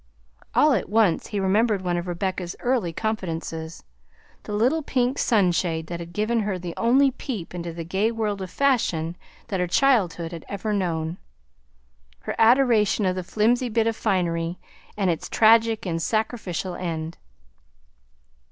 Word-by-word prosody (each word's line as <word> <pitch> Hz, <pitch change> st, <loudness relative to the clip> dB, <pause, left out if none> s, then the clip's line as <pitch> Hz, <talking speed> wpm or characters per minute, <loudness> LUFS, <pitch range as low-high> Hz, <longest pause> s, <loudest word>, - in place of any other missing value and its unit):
All 300 Hz, -1 st, +5 dB
at 195 Hz, -7 st, -1 dB
once 210 Hz, -5 st, +2 dB
he 205 Hz, -, -3 dB
remembered 200 Hz, +1 st, +2 dB
one 175 Hz, -1 st, 0 dB
of 175 Hz, +1 st, -3 dB
Rebecca's 180 Hz, 0 st, -3 dB
early 240 Hz, -9 st, 0 dB
confidences, 165 Hz, -5 st, -4 dB, 0.6 s
the -, -, -9 dB
little 250 Hz, +10 st, +2 dB
pink 255 Hz, -2 st, 0 dB
sunshade 175 Hz, -6 st, +1 dB
that 170 Hz, +1 st, -6 dB
had 170 Hz, 0 st, -8 dB
given 215 Hz, +5 st, 0 dB
her 205 Hz, -3 st, -1 dB
the 175 Hz, -1 st, -6 dB
only 265 Hz, +4 st, +4 dB
peep 225 Hz, -, -6 dB
into 170 Hz, -1 st, -5 dB
the 165 Hz, 0 st, -6 dB
gay 190 Hz, +7 st, 0 dB
world 210 Hz, -3 st, -2 dB
of 185 Hz, -, -5 dB
fashion 175 Hz, -, +1 dB, 0.3 s
that 190 Hz, -, -1 dB
her 180 Hz, -, 0 dB
childhood 180 Hz, -, +2 dB
had 170 Hz, -2 st, -7 dB
ever 205 Hz, +2 st, -3 dB
known; 170 Hz, -4 st, -2 dB, 1.0 s
her -, -, -4 dB
adoration 225 Hz, -4 st, +4 dB
of 185 Hz, -1 st, +1 dB
the 185 Hz, -, -3 dB
flimsy 235 Hz, +6 st, +1 dB
bit 225 Hz, 0 st, +1 dB
of 225 Hz, -1 st, 0 dB
finery 175 Hz, -5 st, -1 dB, 0.4 s
and 195 Hz, -3 st, +2 dB
its 165 Hz, -, -4 dB
tragic 225 Hz, 0 st, +4 dB
and 165 Hz, -2 st, -2 dB
sacrificial 215 Hz, -3 st, -2 dB
end. 165 Hz, -2 st, -4 dB
195 Hz, 150 wpm, -24 LUFS, 170-225 Hz, 1.0 s, All